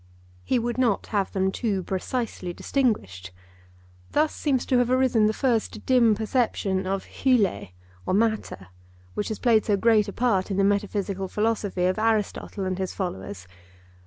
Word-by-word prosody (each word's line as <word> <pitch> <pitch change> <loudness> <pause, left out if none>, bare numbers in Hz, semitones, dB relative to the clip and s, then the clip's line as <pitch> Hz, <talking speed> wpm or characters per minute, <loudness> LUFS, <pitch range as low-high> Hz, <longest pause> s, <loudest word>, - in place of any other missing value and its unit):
He 255 - +1
would 240 +1 -2
not 235 -6 +1
have 200 -2 0
them 190 0 0
too 200 -4 -1
precisely 190 -1 -3
distinguished. 100 - -1 0.8
Thus 305 +1 +1
seems 270 -5 0
to 255 - +2
have 245 -1 +1
arisen 255 -4 +3
the - - +2
first 225 -3 -1
dim 240 -4 +4
perception 205 -4 0
of 195 0 -2 0.2
(Greek) 210 - +1 0.3
or - - +1
matter, 215 - -1 0.4
which 210 - -2
has 220 - -3
played 230 -4 +3
so 205 -2 +2
great 220 0 +3
a 200 - -6
part 215 -7 +1
in 195 - -2
the 200 - +3
metaphysical 200 -1 0
philosophy 210 -3 -1
of 185 +3 +1
Aristotle 215 -2 -1
and 185 0 -2
his 190 -1 -3
followers. 95 - -5
210 Hz, 160 wpm, -25 LUFS, 190-235 Hz, 0.8 s, dim